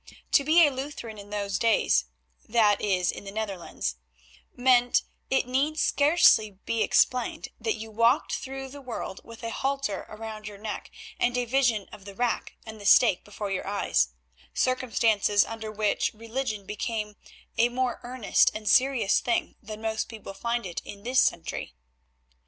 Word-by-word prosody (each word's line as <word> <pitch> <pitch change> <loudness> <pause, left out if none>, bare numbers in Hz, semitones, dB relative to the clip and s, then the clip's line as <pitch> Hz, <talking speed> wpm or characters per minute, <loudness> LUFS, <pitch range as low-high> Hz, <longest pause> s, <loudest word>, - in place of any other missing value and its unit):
To 280 - +5
be 320 +3 +6
a 290 - +2
Lutheran 260 -5 -6
in 200 0 -11
those 200 -1 -2
days, 210 - +3 0.4
that 215 -3 +3
is 185 -3 +1
in - - -9
the 195 - -8
Netherlands, 195 - -4 0.6
meant, 245 -1 +4 0.3
it 265 -1 +2
need 280 +5 0
scarcely 285 - +4
be 230 -1 0
explained, 250 +1 +1
that 445 -3 -1
you 220 0 -8
walked 230 +6 +2
the 270 +1 -7
world 230 -6 -6
with 230 0 -12
a 230 - -3
halter 270 -5 -2
round 215 0 -7
your 205 -1 -8
neck 215 +1 -6 0.3
and 245 +1 +1
a 245 - 0
vision 240 -5 +1
of 195 - -12
the 200 -1 -10
rack 240 +2 -1
and 220 -1 -9
the - - -9
stake 210 -6 +5
before 205 -1 -6
your 190 - -3
eyes; 200 - +1 0.5
circumstances 225 -5 +2
under 220 -1 -6
which 210 -1 0
religion 225 -2 -4
became 210 0 -4 0.4
a 235 +1 +5
more 250 0 -1
earnest 245 -3 +2
and 215 -1 -6
serious 255 -5 +4
thing 345 -2 -1
than 215 -1 -9
most 220 0 -2
people 215 -3 -9
find 235 +3 -2
it 170 -3 -5
in 200 0 -10
this 255 +2 +2
century. - - -1
225 Hz, 160 wpm, -27 LUFS, 205-255 Hz, 0.6 s, be